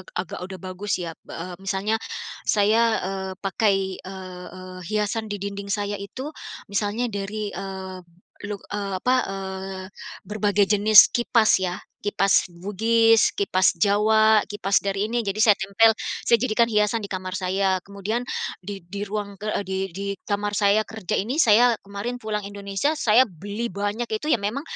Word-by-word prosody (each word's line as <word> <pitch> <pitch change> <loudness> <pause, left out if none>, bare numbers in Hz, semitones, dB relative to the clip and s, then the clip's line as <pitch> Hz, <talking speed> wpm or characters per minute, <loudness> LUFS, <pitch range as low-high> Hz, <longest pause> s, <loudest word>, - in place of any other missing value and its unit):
agak 180 -1 -4
udah 190 +1 -7
bagus 185 +3 -3
ya 165 - -4
b - - -36
eee, 175 +1 -6
misalnya 195 +3 -1 0.5
saya, 210 +2 +4 0.2
eee, 190 0 -3
pakai, 195 -1 +1
eee 185 -1 -9
eee, 185 0 -9
hiasan 215 +1 -1
di 205 - -3
dinding 200 0 -5
saya 205 0 -2
itu 260 +9 -6 0.4
misalnya 215 +4 -1
dari, 205 +1 -4
eee, 190 0 -6 0.5
luk 205 -2 -6
eee, 200 -1 -3
apa, 255 - +3
eee, 190 -1 -5 0.4
berbagai 205 -1 +1
jenis 210 0 +8
kipas 235 -4 +3
ya, 180 -1 -1 0.3
kipas 200 -1 +3
Bugis, 225 +5 +3
kipas 185 -2 +2
Jawa, 215 +3 +4
kipas 200 -1 +1
dari 200 +2 -1
ini 235 -1 -1
jadi 200 +2 -1
saya 215 -3 +6
tempel, 200 +4 +4 0.3
saya 235 - +4
jadikan 230 0 +2
hiasan 210 +1 +2
di 200 - -6
kamar 185 -1 -4
saya. 190 0 0
Kemudian 200 +4 -3 0.4
di 195 -1 -8
di 200 +3 -6
ruang, 205 0 -4
eee, 210 -1 -2
di 190 +1 -3
di 195 +3 -6 0.2
kamar 205 0 -1
saya 205 +1 +3
kerja 220 -6 -3
ini 255 +11 +1
saya 235 +2 +6
kemarin 205 +5 -5
pulang 210 -2 -3
Indonesia, 200 +7 -2
saya 255 -5 +4
beli 205 +2 -5
banyak 205 +4 -2
itu 220 +7 -3
ya 270 - +4
memang 215 +6 -2
205 Hz, 160 wpm, -24 LUFS, 195-215 Hz, 0.5 s, jenis